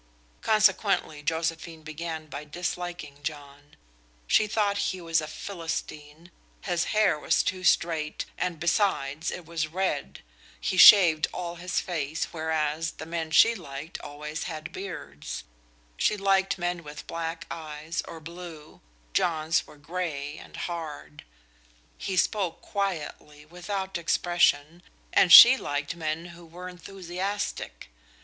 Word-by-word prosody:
Consequently 205 -7 +2
Josephine 165 +1 -3
began 160 +1 -5
by 150 -1 -7
disliking 175 -2 -5
John. 145 -1 -8 0.5
She 215 - +3
thought 205 -1 0
he 185 - -4
was 165 -2 +1
a 155 - -5
Philistine; 165 -2 -6 0.3
his 175 -2 0
hair 210 -7 +2
was - - +2
too 185 -1 -2
straight, 165 -3 +1
and 180 -3 -3
besides, 170 -4 0
it 180 - -6
was 165 -1 -2
red; 160 - -2 0.4
he - - -2
shaved 175 -5 +8
all 175 -1 -5
his 180 +1 -1
face, 160 -3 -2
whereas 160 -1 -1
the 160 - -8
men 165 -1 -3
she 195 +9 +6
liked 150 -5 -8
always 150 +1 -6
had 160 -2 -6
beards; 165 - -7 0.5
she 210 - +2
liked 195 -1 +2
men 175 -1 -2
with 150 0 -10
black 165 0 -4
eyes, 155 0 -5
or 165 - -8
blue 165 -1 -10 0.3
John's 160 -1 +1
were 150 - -15
gray 150 -2 -4
and - - -12
hard; 155 - -6 0.7
he 190 -1 -3
spoke 190 -2 0
quietly, 155 -6 -4
without 190 +3 -4
expression, 170 -2 +1 0.3
and 180 - +5
she 240 +9 +12
liked 145 - -3
men 165 +1 -3
who 170 +1 -14
were 175 +2 -10
enthusiastic. 185 - -5
165 Hz, 130 wpm, -27 LUFS, 155-180 Hz, 0.7 s, she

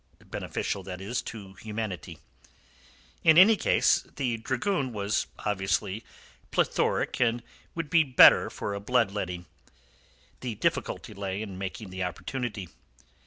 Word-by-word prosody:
Beneficial, 100 - -3
that 90 -1 -7
is, 110 +6 -2
to 100 -4 -9
humanity. 105 -6 -5 1.1
In 160 -1 +6
any 205 +5 +9
case, - - +3
the 125 -5 -1
dragoon 130 - -1
was 100 0 -1 0.2
obviously 95 +1 -1 0.5
plethoric - - +1
and 120 0 +2 0.3
would 165 -3 -4
be 165 - +6
the 135 -5 -4
better - - +8
for 100 - -4
a 100 - -3
blood 115 0 +2
letting. 90 -3 -4 0.9
The 120 -4 -4
difficulty 105 - -2
lay 100 +1 -4
in 95 -3 -7
making 95 +1 -6
the 95 0 -5
opportunity. 105 +1 -4
105 Hz, 130 wpm, -28 LUFS, 95-125 Hz, 1.1 s, any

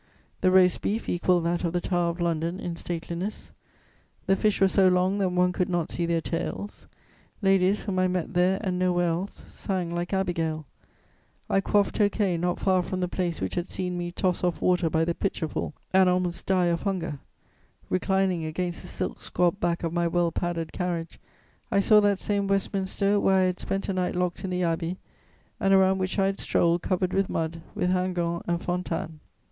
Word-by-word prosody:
The 185 - +4
roast 185 -1 +4
beef 220 +3 -2
equalled 175 0 +2
that 170 +1 0
of 170 -1 -1
the 175 - +1
Tower 175 -1 0
of 170 +1 -5
London 170 +1 -1
in 175 -1 -4
stateliness; 170 +4 -5 0.7
the 195 - +3
fish 210 +1 +1
were 195 - +5
so 190 0 +4
long 185 +2 +2
that 190 -2 +2
one 180 0 +2
could 180 0 -1
not 175 -3 -1
see 170 -1 -1
their 170 -1 +1
tails; 175 +5 -4 0.6
ladies, 195 +1 +3
whom 190 -3 -2
I 185 - +3
met 180 0 -2
there 180 +2 +3
and 180 -3 -1
nowhere 175 -1 +2
else, 175 +4 -4
sang 180 -3 -3
like 175 0 -3
Abigail. 165 -5 -1 0.9
I 195 - +3
quaffed 205 +2 +1
tokay 205 -3 +2
not 175 +1 0
far 185 -1 +3
from 185 +1 -4
the 180 - +1
place 175 -2 -2
which 95 - -3
had 175 +1 -2
seen 180 -1 -3
me 175 0 -3
toss 180 0 -1
off 180 -1 0
water 180 -2 +2
by 160 0 +1
the 170 - 0
pitcherful 165 -5 -3 0.2
and 190 -1 +6
almost 180 -1 -1
die 185 -2 +3
of 170 -1 +1
hunger; 175 -7 -2 0.7
reclining 190 -2 +1
against 175 +3 -3
the - - -9
silk - - -4
squabbed 180 +2 0
back 170 0 0
of 165 -1 -2
my 170 0 +1
well 170 0 +1
padded 170 -1 -3
carriage, 175 -2 -3 0.5
I 200 - +2
saw 210 +2 +6
that 205 -1 +3
same 200 0 -1
Westminster 195 +1 +1
where 195 -1 +3
I 190 - +4
had 185 -1 0
spent 195 0 -3
a 195 - -1
night 180 -1 -1
locked 180 +1 -1
in 190 - -3
the 180 0 -1
Abbey, 165 +1 -1 0.6
and 195 0 +4
around 190 0 +4
which 185 +2 -2
I 195 - +3
had 195 0 -1
strolled, 170 0 +2
covered 185 0 -1
with 195 -1 +1
mud, 165 0 -2
with 180 - +1
Hingant 175 -2 0
and 170 0 0
Fontanes. 170 -3 -3
180 Hz, 195 wpm, -26 LUFS, 170-190 Hz, 0.9 s, and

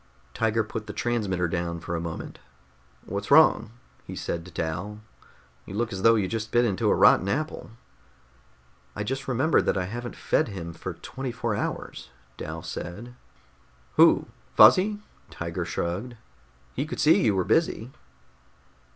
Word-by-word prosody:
Tiger 110 0 +1
put 110 0 -6
the - - -6
transmitter 100 -7 -1
down 85 0 -3
for 85 +1 -4
a 80 - -2
moment. 85 -1 -6 0.7
"What's 100 0 -4
wrong?" 140 -7 +6 0.3
he - - -8
said 85 - -3
to 90 - -12
Dal. 85 +7 -4 0.7
"You 95 - -7
look 110 -1 -1
as 95 - -4
though 115 +2 +6
you 100 -4 +1
just 110 +1 -4
bit 120 0 +4
into 100 -5 +1
a - - +4
rotten 95 - +5
apple." 155 +9 -3 1.3
"I 105 - -3
just 135 +5 -4
remembered 130 +5 +2
that - - +2
I 90 - -1
haven't 120 +5 -6
fed - - +1
him 85 -5 -6
for 90 +1 -6
twenty 130 +9 -6
four 115 -1 -2
hours," 100 - -4 0.3
Dal - - -6
said. 110 +8 -7 0.8
"Who? - - +6 0.3
Fuzzy?" 205 +3 +7 0.3
Tiger 85 +2 -4
shrugged. 90 +9 -3 0.6
"He 140 +4 -2
could - - -6
see 155 - +5
you 105 -5 +3
were 95 - +2
busy." 130 - +1
105 Hz, 155 wpm, -26 LUFS, 90-120 Hz, 1.3 s, Fuzzy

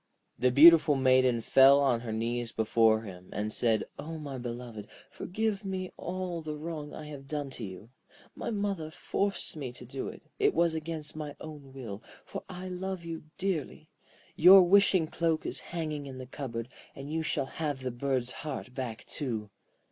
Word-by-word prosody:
The 125 - +4
beautiful 150 +3 +8
Maiden 130 -2 +4
fell 135 +4 +7
on 135 -4 +3
her 115 -1 -5
knees 115 +1 -2
before 110 0 +3
him, 90 -4 -10
and 105 +1 -2
said: 110 -3 +3 0.2
'O 160 +3 -5
my 140 -4 -6
beloved, 120 -3 -6 0.2
forgive 215 +1 -2
me 190 -1 -4
all 180 -1 -4
the 155 -1 -5
wrong 155 -1 -5
I 155 - -8
have 140 -2 -9
done 145 -2 -3
you. 105 +1 -8 0.4
My - - -4
mother 200 -7 -2
forced 195 +4 -2
me 135 -5 -5
to 125 - -11
do 130 +2 -5
it. - - -9 0.2
It 415 -1 +3
was 170 -1 +3
against 160 -1 -5
my 150 -2 -5
own 150 -3 -9
will, 115 -6 -7 0.2
for - - -6
I 185 0 -6
love 185 -1 -4
you 165 -2 -6
dearly. 170 -4 -3 0.5
Your 185 +3 +9
wishing 185 -2 +5
cloak 165 0 0
is - - -1
hanging 155 -4 -4
in 130 -1 -8
the 130 - -7
cupboard, 125 -3 -5 0.3
and 140 +2 -7
you 160 - 0
shall 155 - -1
have 145 -2 -4
the 130 - -2
bird's 125 0 -1
heart 135 -4 -6
back 125 -4 -5
too.' 110 -8 -3
145 Hz, 175 wpm, -30 LUFS, 125-165 Hz, 0.5 s, Your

